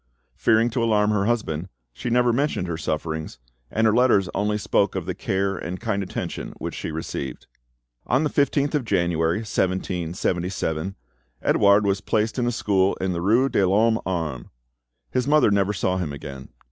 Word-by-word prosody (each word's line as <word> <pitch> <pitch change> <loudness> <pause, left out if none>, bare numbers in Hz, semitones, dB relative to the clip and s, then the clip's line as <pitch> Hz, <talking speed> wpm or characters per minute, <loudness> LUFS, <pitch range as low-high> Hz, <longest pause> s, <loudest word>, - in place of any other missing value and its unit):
Fearing 115 +1 +3
to 115 +1 0
alarm 105 -2 +3
her 100 -2 +1
husband, 95 -7 -1 0.2
she 120 - -4
never 120 0 +3
mentioned 140 -7 0
her 85 - -2
sufferings, 80 -2 -3 0.3
and 110 +1 +1
her 110 - +4
letters 115 -6 +4
only 105 +1 0
spoke 105 - +1
of - - -3
the - - -2
care 95 +1 -1
and 90 +1 -5
kind 105 -3 -1
attention 95 - -5
which - - -5
she - - -5
received. 75 -5 -5 0.6
On 130 +6 +2
the 150 - +1
15th 145 0 +1
of 150 -3 +1
January, 85 -5 +1
1777, 90 -2 -2 0.5
Edouard 100 +1 +4
was 100 -1 +1
placed 110 +3 0
in 120 - +1
a - - +1
school 100 -4 +1
in 95 -1 -2
the 85 - -3
rue 115 +8 +3
de 100 - +1
l'Homme 110 +5 +3
Arme. 80 -9 -3 0.6
His 125 +1 0
mother 150 -7 +4
never 100 0 +2
saw 95 -2 0
him 85 -5 -2
again. 70 -2 -8
100 Hz, 170 wpm, -24 LUFS, 85-115 Hz, 0.6 s, her